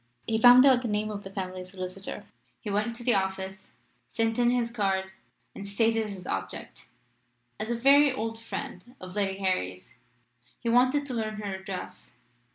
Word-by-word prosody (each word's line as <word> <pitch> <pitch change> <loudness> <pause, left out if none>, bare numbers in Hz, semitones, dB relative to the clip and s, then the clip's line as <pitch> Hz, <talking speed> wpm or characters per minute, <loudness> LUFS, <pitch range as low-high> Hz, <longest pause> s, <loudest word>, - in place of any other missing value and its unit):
He 220 -1 0
found 245 +3 +9
out 260 -3 +6
the 245 - -3
name 215 0 -1
of 205 -1 -5
the 195 - -9
family 185 -2 -5
solicitor, 185 +1 -6 0.3
he 210 - -5
went 215 +3 -1
to 240 - -9
the 245 0 +3
office, 190 -1 -3 0.3
sent 225 0 0
in 240 0 +4
his 240 -1 0
card, 195 -4 -1 0.4
and 200 - -8
stated 225 +1 +1
his 190 -3 -8
object. 95 0 -5 0.7
As 220 - -4
a 240 - 0
very 280 +3 +6
old 225 -2 -4
friend 245 +1 -7
of 185 +1 -9
Lady 195 -2 0
Harry's, 95 - -3 0.6
he 235 - -2
wanted 255 +4 +3
to 265 - -5
learn 220 -2 -2
her 205 -2 -4
address. 190 -9 -8
215 Hz, 170 wpm, -28 LUFS, 190-240 Hz, 0.7 s, found